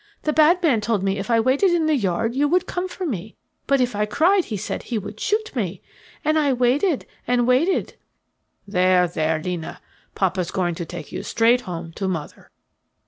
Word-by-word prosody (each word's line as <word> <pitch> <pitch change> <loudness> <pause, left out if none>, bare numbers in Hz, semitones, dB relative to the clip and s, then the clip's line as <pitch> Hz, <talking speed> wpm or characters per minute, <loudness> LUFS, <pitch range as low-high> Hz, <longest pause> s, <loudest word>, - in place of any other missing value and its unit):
The 305 - 0
bad 330 +4 +4
man 260 -10 +3
told 210 -2 0
me 195 +1 0
if 195 - -5
I 230 -1 +4
waited 260 - +3
in 345 -2 +2
the 310 -1 +3
yard 215 0 0
you 285 +3 +2
would 360 +4 +2
come 365 0 -3
for 370 - -5
me. 215 - -4 0.3
But 275 -1 +3
if 245 -4 0
I 210 +1 0
cried 360 - +3
he 215 - -4
said - - -4
he 235 - -3
would 205 +1 -7
shoot 435 -2 -1
me. 200 -6 -2 0.5
And 310 +1 +3
I 285 -3 +2
waited, 260 +6 +1 0.2
and 245 -1 +2
waited 285 +10 +1 0.4
" - - -48
"There, 180 0 +4
there, 160 -1 -1
'Lina, 175 0 -5 0.4
papa's 185 -2 0
going 175 -2 -1
to 170 0 -5
take 175 +1 -8
you - - -4
straight 235 +2 +2
home 165 -1 -6
to 195 - -2
mother." 165 -5 -5
230 Hz, 200 wpm, -22 LUFS, 185-305 Hz, 0.5 s, bad